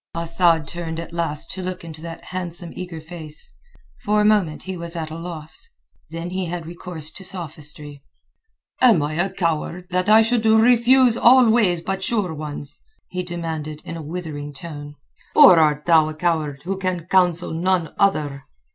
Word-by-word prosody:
Asad 170 -2 +4
turned 165 -1 -5
at 170 0 -8
last 165 -2 -3
to 190 - -5
look 185 -1 -5
into 160 -1 -10
that 165 0 -8
handsome 175 -2 -6
eager 175 -3 -6
face. 160 -1 -8 0.5
For 210 -2 +1
a 210 - +3
moment 205 -8 +2
he 190 0 -5
was 170 0 -7
at 160 -2 -4
a - - -6
loss; 165 - -7 0.4
then 165 +2 -6
he 185 0 -2
had 170 -1 -5
recourse 170 -2 -8
to 190 - -10
sophistry. 150 -5 -5 0.8
"Am 230 - +5
I 150 +1 -2
a 175 +5 0
coward 170 0 -2
that 185 +2 0
I 220 +1 +7
should 230 0 +1
refuse 240 +2 +5
all 250 0 +6
ways 190 -7 +2
but 190 +2 -3
sure 195 -4 -1
ones?" 145 -2 -7 0.3
he 180 - -3
demanded 160 -4 -5
in - - -6
a 165 - -6
withering 150 -2 -6
tone. 145 0 -9 0.4
"Or 180 -3 +9
art 150 -1 +2
thou 160 -2 +5
a 155 - -7
coward 155 -4 -1
who 190 +2 -3
can 185 -3 -2
counsel 180 -2 +2
none 175 -1 0
other?" 145 -8 +1
170 Hz, 175 wpm, -21 LUFS, 155-185 Hz, 0.8 s, Or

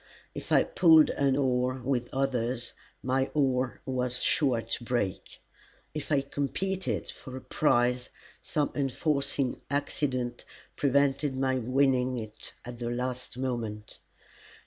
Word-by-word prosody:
If - - -8
I - - +6
pulled 320 - +6
an 140 -1 +2
oar 130 -2 +1
with 125 -2 0
others, 125 -3 -1 0.3
my 130 +1 +1
oar 130 -3 +1
was 125 -1 -1
sure 125 -6 +2
to 115 +2 -4
break. 120 -6 -2 0.5
If 150 0 -5
I 140 -2 +4
competed 180 +8 -2
for 130 0 -9
a - - -7
prize, 125 -4 +2 0.3
some 150 -2 -1
unforeseen 140 -1 0
accident 130 -3 -1 0.3
prevented 140 0 +2
my 130 -1 +1
winning 130 0 +2
it 110 -2 -6
at 120 -1 -8
the 120 -1 -2
last 125 0 -3
moment. 115 -5 -4
130 Hz, 125 wpm, -29 LUFS, 125-140 Hz, 0.5 s, I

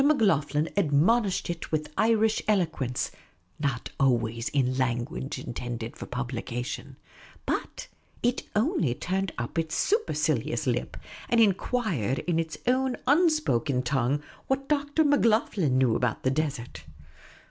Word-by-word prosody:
Macloghlen 165 - +3
admonished 195 +5 +2
it 170 -1 -5
with 155 -1 -2
Irish 220 -1 +3
eloquence, 160 - 0 0.5
not 140 -5 -2
always 115 -3 +1
in 130 -2 +1
language 130 +3 -2
intended 120 -2 -5
for - - -8
publication; 125 0 -4 0.5
but - - -3 0.4
it 240 +1 0
only 210 - +1
turned 190 +3 -2
up 120 +7 -2
its 160 -1 -2
supercilious 440 +3 0
lip - - -1 0.3
and 235 - +3
enquired 195 - +1
in 170 -2 +1
its 165 -1 -3
own 255 +1 +1
un 320 +7 +5
spoken 140 - 0
tongue 135 +2 0 0.2
what 270 +1 0 0.3
he 230 - +3
knew 130 -3 +3
about 120 -2 -1
the 130 - +2
desert. 135 - -3
155 Hz, 120 wpm, -27 LUFS, -, 0.5 s, un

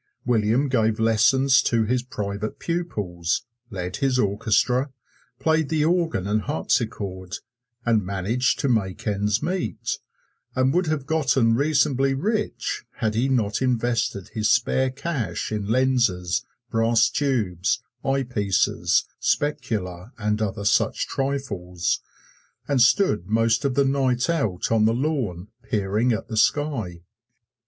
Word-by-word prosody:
William 120 +3 +2
gave 110 -4 +1
lessons 125 +5 +4
to 115 -2 +1
his 125 +3 +1
private 105 -3 -4
pupils, 105 - -2 0.2
led 90 -3 -4
his 135 -2 +1
orchestra, 125 +5 +1 0.5
played 160 -2 +1
the 155 -1 +1
organ 165 - +1
and 105 +2 +1
harpsichord, 95 +1 -2 0.5
and 115 -3 +2
managed 100 +7 0
to 140 - -1
make 100 -7 -1
ends 105 0 0
meet, 185 +1 -2 0.6
and 130 +1 +2
would 180 -1 +1
have 155 -3 -1
gotten 135 -7 +2
reasonably 135 0 +2
rich 210 +8 -2
had 110 -1 -1
he 120 +5 +1
not 110 -5 0
invested 120 -6 0
his 110 -1 -1
spare 130 0 +2
cash 130 - -3
in 105 -2 -2
lenses, 115 -7 +1 0.2
brass 115 0 +3
tubes, 115 - 0 0.2
eyepieces, 125 -8 +1 0.2
specula 110 -8 -2
and 105 0 -1
other 100 -1 -2
such - - +2
trifles, 105 -11 -2 0.7
and 140 -3 +2
stood 120 - +3
most 115 +1 +2
of 135 -2 0
the 140 - +3
night 130 -2 +1
out 110 - -1
on 110 -1 +4
the 115 +1 +3
lawn 120 - -2
peering 105 +2 0
at 110 - -2
the 110 - -4
sky. 110 - 0
115 Hz, 125 wpm, -24 LUFS, 105-135 Hz, 0.7 s, lessons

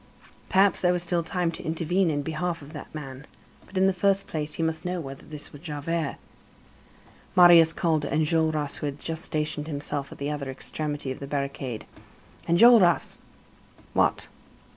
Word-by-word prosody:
Perhaps 195 +1 +4
there 180 -1 +3
was 175 -1 -1
still 175 0 +1
time 170 +1 -1
to 165 - -8
intervene 170 +3 +1
in 145 -2 -1
behalf 165 +1 -3
of 145 +3 -12
that 150 - -7
man. 135 -2 -8 0.4
But, 195 - -8
in 190 - +4
the 195 - +3
first 195 +1 +1
place, 150 -1 -4
he 165 - -2
must 160 0 -1
know 180 0 -2
whether 135 -3 -8
this 150 -1 -9
was 145 - -11
Javert. 155 -1 -3 1.2
Marius 175 -2 +8
called 160 -2 +1
to 145 - -4
Enjolras, 155 -1 +1
who 150 - -3
had 140 0 -4
just 165 0 -5
stationed 150 -3 -3
himself 145 -2 -4
at - - -10
the 140 +1 -3
other 145 -2 -4
extremity 145 +1 -4
of 130 - -6
the 140 - -6
barricade: 140 -4 -4 0.6
"Enjolras!" 180 0 +5 0.7
"What?" - - +1
160 Hz, 170 wpm, -26 LUFS, 145-175 Hz, 1.2 s, Marius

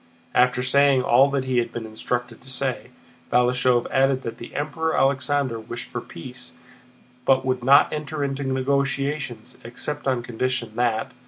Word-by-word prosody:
After 125 0 +3
saying 140 0 +4
all 130 +4 +5
he 130 -2 0
had 120 - -2
been 115 -1 -5
instructed 120 +3 -4
to 135 - -10
say, 130 0 -1 0.4
Balashëv 125 0 +3
added 135 0 +2
that 115 0 -6
the 120 - -10
Emperor 160 +2 -1
Alexander 135 -2 +1
wished 120 +2 -7
for 120 - -4
peace, 125 +9 -10 0.7
but 130 0 +3
would 130 -1 -1
not 140 +3 +5
enter 150 -1 -3
into 140 0 -2
negotiations 135 -2 -1
except 140 +5 -4
on 130 -3 0
condition 120 -1 -2
that... 120 0 0
130 Hz, 150 wpm, -23 LUFS, 120-140 Hz, 0.7 s, all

